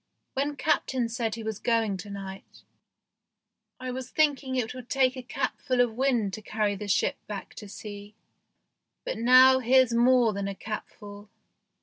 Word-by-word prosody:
" - - -52
When 285 +2 -1
Captain 260 -4 0
said 230 -2 -2
he 230 - -7
was 220 -1 -4
going 225 -3 +1
to 185 +3 -9
night, 195 -1 -9 1.2
I 255 0 -4
was 255 0 -6
thinking 285 -4 +1
it 240 -3 -1
would 255 -1 -10
take 260 -1 +2
a 255 - -6
capful 250 +1 -2
of 245 -2 +3
wind 240 -5 0
to 215 - -6
carry 215 -1 -1
the 205 +1 -7
ship 200 - +1
back 205 -2 -7
to 210 - -9
sea, 205 0 -9 0.9
but - - -3
now 255 +2 +7
here's 255 -1 +4
more 240 -1 +4
than 200 0 -3
a 200 - -4
capful." 205 0 -8
230 Hz, 170 wpm, -27 LUFS, 210-255 Hz, 1.2 s, now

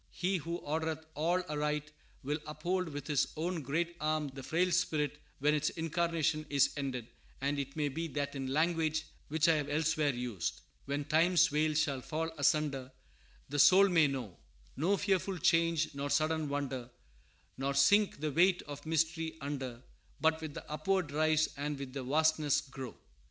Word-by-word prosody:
He 185 +2 -1
who 170 +1 -4
ordereth 160 +1 -2
all 175 +4 +1
aright 150 -1 -2 0.3
will 145 +3 -1
uphold 175 +4 -2
with 145 -1 -6
His 145 -3 +1
own 170 +1 -2
great 165 +5 -1
arm 155 -1 0
the 135 0 -9
frail 175 +7 +1
spirit 150 -4 0 0.2
when 150 +2 +2
its 150 0 +1
incarnation 165 -1 0
is 140 -2 +3
ended; 130 -5 -3 0.3
and 140 +1 -1
it 140 0 -4
may 150 -2 0
be, 165 +4 -3
that, 145 -1 -3
in 135 -1 -4
language 155 +2 +1 0.2
which 160 +2 +2
I 165 -1 +5
have 145 -1 -2
elsewhere 155 0 +1
used, 120 -9 -3 0.2
when 140 +1 -2
Time's 170 +3 +4
veil 155 +1 +1
shall 140 -3 +1
fall 160 +4 -3
asunder, 140 -3 +1 0.6
The 145 +1 -2
soul 185 +8 +7
may 165 -4 +5
know 125 -10 -5 0.4
No 180 +8 +2
fearful 195 -1 0
change 165 -1 +2
nor 140 0 -3
sudden 155 0 +1
wonder, 135 -4 -3 0.7
Nor 140 +1 -1
sink 200 +5 +4
the 155 -1 -1
weight 180 +5 +3
of 145 -1 -8
mystery 160 0 0
under, 135 -4 -5 0.4
But 160 +1 +2
with 155 -2 -6
the - - -8
upward 185 +1 0
rise 155 +1 +3
and 145 +1 -2
with 135 -2 -7
the 140 - -4
vastness 150 +1 +2
grow. 135 -4 -8
150 Hz, 165 wpm, -33 LUFS, 140-165 Hz, 0.7 s, soul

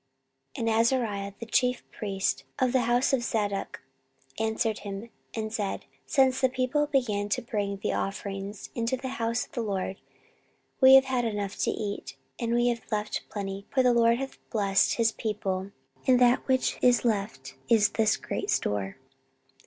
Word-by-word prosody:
14:031:010 - - -5
And 220 - +2
Azariah 220 -5 0
the 230 - -6
chief 250 +2 +1
priest 195 -3 -2
of 255 -1 +2
the 260 - +4
house 245 +3 +2
of 265 - +3
Zadok 205 -4 -2 0.6
answered 220 0 0
him, 200 +3 -7 0.2
and 220 -1 -3
said, 205 -3 -3 0.2
Since 265 -1 +3
the 260 - +4
people 260 +4 0
began 220 -8 0
to - - 0
bring 205 -4 -2
the 195 - -2
offerings 195 0 -4
into 235 +2 -1
the 260 +1 -5
house 230 +1 0
of - - -27
the 240 - -3
LORD, 195 -3 -2 0.8
we 265 0 +9
have 270 0 +7
had 255 -2 0
enough 205 -3 -2
to - - +1
eat, 200 - -4 0.2
and 235 0 +1
have 235 -2 -2
left 215 0 -1
plenty: 195 -1 -5
for 260 - +3
the 250 -1 +4
LORD 235 0 +4
hath 270 +1 -6
blessed 200 -3 +2
his 230 -1 +3
people; 195 -4 -3 0.4
and 255 -1 +5
that 245 0 +4
which 260 -1 +1
is 245 0 +4
left 210 -2 -2 0.2
is 220 -3 +5
this 220 -1 +2
great 400 - -4
store. 100 0 -1
225 Hz, 170 wpm, -28 LUFS, 200-250 Hz, 0.8 s, we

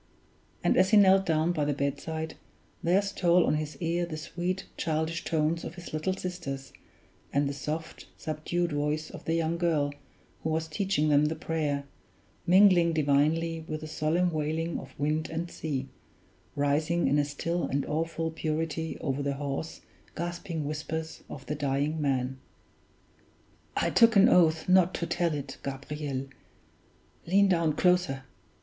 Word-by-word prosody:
And - - +3
as 190 - +5
he 215 - +6
knelt 195 -1 +6
down 160 +1 +2
by 155 -4 0
the 145 -1 0
bedside, 160 +3 -3 0.5
there 185 +4 +3
stole 180 -3 +3
on - - +2
his 155 0 -3
ear 170 +1 0
the 165 -2 -4
sweet, 180 +4 -3
childish 160 +1 -1
tones 160 +1 0
of 170 - -6
his 175 -3 -9
little 155 +4 0
sisters, 150 -9 -5 0.6
and 140 0 +2
the 140 - -2
soft, 150 +3 -5
subdued 165 +3 -2
voice 150 +1 -1
of - - -10
the 165 - +1
young 165 0 0
girl 155 -5 +1 0.5
who 160 - -2
was 160 +1 -1
teaching 155 -1 0
them 145 0 +5
the 155 +2 0
prayer, 150 -4 -1 0.6
mingling 180 -2 +6
divinely 160 +2 +2
with 155 0 -4
the 155 - -6
solemn 160 +3 +1
wailing 160 +2 -1
of - - -12
wind 155 +2 0
and 165 +2 -4
sea, 135 -4 -3 0.7
rising 155 +4 +1
in 145 - +3
a - - +3
still 165 +4 -2
and 140 0 -1
awful 165 +1 -2
purity 160 0 -2
over 140 -1 -1
the 140 0 -1
hoarse, 140 +3 -4 0.3
gasping 170 -2 -4
whispers 160 +2 -4
of 135 - -8
the - - -2
dying 145 +2 -1
man. 130 -2 0 1.4
"I - - +1
took 230 -1 +6
an 195 - +7
oath 160 -3 +4
not 185 -1 +4
to 170 - -2
tell 170 -2 0
it, 140 -2 -6
Gabriel 140 0 -4 1.0
lean 195 +3 +4
down 165 -4 +2
closer! 180 -5 +2
160 Hz, 155 wpm, -29 LUFS, 145-170 Hz, 1.4 s, an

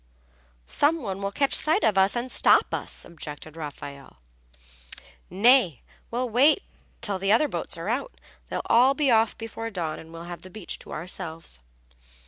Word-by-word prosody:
"Some 300 - +2
one 195 -2 -4
will 200 0 -2
catch 275 +6 +1
sight 310 +1 +3
of 215 -3 +3
us 195 +3 +3
and 245 +1 -3
stop - - +4
us," - - -3
objected 155 -1 -9
Raffaelle. 145 -3 -8 1.1
"Nay, 195 - +4 0.3
we'll 250 +2 -1
wait 275 - +4 0.4
till 205 -4 0
the 195 +1 +1
other 265 +8 +4
boats - - -4
are - - -6
out. - - -3 0.3
They'll - - -3
all 255 +4 +5
be 285 -3 +2
off 225 -1 +3
before 225 0 -5
dawn 170 -7 -3
and 160 - -12
we'll 165 0 -8
have 175 0 -8
the 185 - -11
beach 205 -2 -6
to - - -12
ourselves." 160 - -6
200 Hz, 165 wpm, -26 LUFS, 165-250 Hz, 1.1 s, all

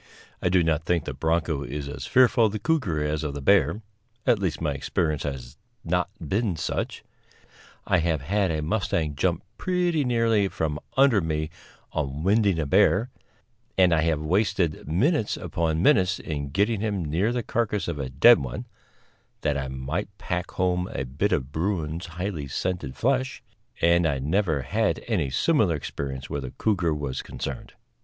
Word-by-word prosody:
I - - +2
do 90 -1 +4
not 80 -1 +1
think 85 -2 0
the - - -4
bronco 80 -2 0
is 70 +1 -5
as 70 - -6
fearful 125 -2 +5
of 105 - -5
the - - -1
cougar 105 - 0
as 75 +1 -1
of 75 -2 -3
the - - -3
bear, 100 +4 +3 0.4
at 115 - +4
least 95 -5 -1
my 75 -3 -1
experience 75 +1 -1
has 65 -4 -5 0.3
not 90 +2 0
been 95 +4 -1
such. 80 - -3 0.8
I 90 - +3
have 80 -3 0
had 100 +6 +1
a 80 -2 -1
mustang 80 -4 0
jump 85 +4 0 0.2
pretty 180 -4 +1
nearly 115 -5 +2
from 75 -5 -2 0.2
under 135 -7 +5
me 80 -1 -2 0.4
on 75 -1 -3
winding 100 -1 +3
a 80 - 0
bear, 105 - +3 0.7
and 90 -2 +5
I 80 - +3
have 80 -2 +1
wasted 90 0 0
minutes 110 - +1
upon 80 0 -1
minutes 95 -10 +4
in 70 -3 -4
getting 100 +7 +1
him 100 -6 -1
near 85 +10 +1
the 120 -1 -1
carcass 105 -3 -1
of 85 -4 -3
a 65 -2 -3
dead 65 - +7
one, 65 -3 -5 0.8
that 75 -2 +1
I 70 -1 -2
might 65 +9 -4
pack 90 -4 -3
home 90 -1 0
a 65 - -2
bit 75 +12 -1
of 65 0 -1
bruin's 85 0 -2
highly 85 -3 -4
scented 65 -1 -3
flesh, 130 +1 0 0.4
and 85 0 +4
I 70 -3 0
never 80 +1 0
had - - 0
any 70 - 0
similar 100 - +2
experience 70 -2 -5
where 70 - -3
the 65 - -5
cougar 90 -6 +1
was 70 -3 -3
concerned. - - -6
85 Hz, 170 wpm, -25 LUFS, 75-100 Hz, 0.8 s, dead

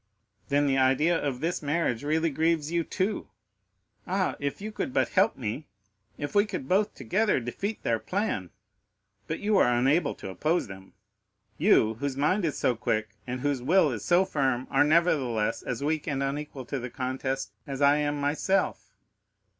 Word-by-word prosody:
"Then 145 +1 +3
the 135 -1 +2
idea 135 +6 +3
of 140 -6 -2
this 170 +2 -1
marriage 145 -5 0
really 160 +2 +1
grieves 160 +1 +1
you 170 -1 +1
too? 195 +5 -2 0.8
Ah, 185 0 0
if 140 0 -3
you 215 +2 -5
could 255 +4 -4
but - - +2
help 200 +4 +2
me—if 105 0 -8
we 205 - +5
could 135 -10 -5
both 205 +5 +1
together 210 -4 +1
defeat 195 - -4
their 115 -1 +1
plan! 180 - -2 0.8
But 160 - -4
you 210 0 +2
are 125 - +4
unable 135 +6 +2
to - - -8
oppose 155 - 0
them,—you, 95 +2 -1
whose 140 -1 -2
mind 175 +7 +2
is 150 - -1
so 125 - +1
quick, 110 -1 -1 0.2
and 125 0 -4
whose 145 -2 0
will 160 +3 +4
is 110 -4 -5
so 175 +7 +4
firm 135 -8 0
are - - +5
nevertheless, 140 -9 +2
as 125 +2 -4
weak 155 +1 -1
and 140 -3 -1
unequal 140 -1 -4
to 140 +3 -3
the 125 +1 -5
contest 130 -3 -3 0.2
as 135 -1 -5
I 145 +1 +5
am 145 -1 -1
myself. 150 +7 0
145 Hz, 170 wpm, -27 LUFS, 125-170 Hz, 0.8 s, we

